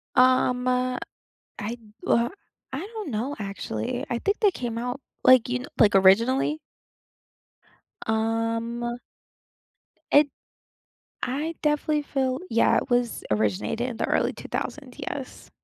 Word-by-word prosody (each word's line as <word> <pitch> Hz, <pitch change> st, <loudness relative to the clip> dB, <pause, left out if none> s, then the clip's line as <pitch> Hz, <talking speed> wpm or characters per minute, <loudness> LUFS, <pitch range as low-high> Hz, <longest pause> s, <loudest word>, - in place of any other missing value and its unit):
Um, 255 Hz, -1 st, +4 dB
uh, 250 Hz, 0 st, +1 dB, 0.6 s
I 230 Hz, +3 st, -4 dB, 0.3 s
uh, 235 Hz, +1 st, +3 dB, 0.4 s
I 265 Hz, -, -2 dB
don't 420 Hz, 0 st, -6 dB
know, 245 Hz, +5 st, -2 dB
actually, 195 Hz, -, -3 dB
I 235 Hz, -, 0 dB
think 405 Hz, -, 0 dB
they 420 Hz, -3 st, +5 dB
came 240 Hz, -9 st, -4 dB
out, 245 Hz, +3 st, -3 dB, 0.2 s
like, 255 Hz, -2 st, +7 dB
you 250 Hz, 0 st, -1 dB
kn 255 Hz, -, -7 dB
like, 210 Hz, -3 st, +5 dB
originally? 230 Hz, +10 st, +4 dB, 1.5 s
Um 230 Hz, +2 st, -1 dB, 1.1 s
It 290 Hz, 0 st, +6 dB, 0.9 s
I 295 Hz, +6 st, -2 dB
definitely 300 Hz, 0 st, +1 dB
feel 265 Hz, -2 st, -1 dB
yeah, 230 Hz, -, +4 dB
it -, -, -4 dB
was 245 Hz, -1 st, +1 dB
originated 105 Hz, -, 0 dB
in 240 Hz, -, -5 dB
the -, -, -2 dB
early -, -, +1 dB
2000, -, -, -5 dB
yes. -, -, -6 dB
245 Hz, 125 wpm, -26 LUFS, 225-265 Hz, 1.5 s, like